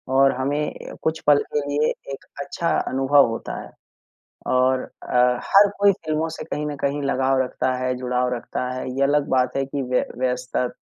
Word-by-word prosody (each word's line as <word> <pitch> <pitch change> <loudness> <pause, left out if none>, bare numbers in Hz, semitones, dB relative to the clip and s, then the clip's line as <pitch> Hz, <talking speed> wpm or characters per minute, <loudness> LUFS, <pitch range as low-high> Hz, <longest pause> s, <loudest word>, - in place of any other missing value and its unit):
और 135 0 +6
हमें 145 +3 -3
कुछ 160 0 0
पल 145 -1 +7 0.2
के 150 - +2
लिए 145 +1 +2 0.2
एक 135 - -9 0.2
अच्छा 155 +4 -2 0.2
अनुभव 135 +1 +4
होता 115 - -5
है - - -12 0.8
और 130 0 +3 0.3
अ, - - -1 0.3
हर 200 +1 +6
कोई 200 0 +5
फ़िल्मों 160 -3 -2
से - - -7
कहीं 150 0 -3
न 150 -1 -4
कहीं 145 +1 0
लगाव 135 -1 +1
रखता 130 0 -1
है, 130 - 0
जुड़ाव 125 0 -1
रखता 125 +1 -4
है, 130 - -5
ये - - +2
अलग 145 +1 +2
बात 130 0 +1
है 135 - +1
कि 140 +1 -3
व्य-व्यस्ता 125 0 -1
135 Hz, 180 wpm, -23 LUFS, 130-150 Hz, 0.8 s, पल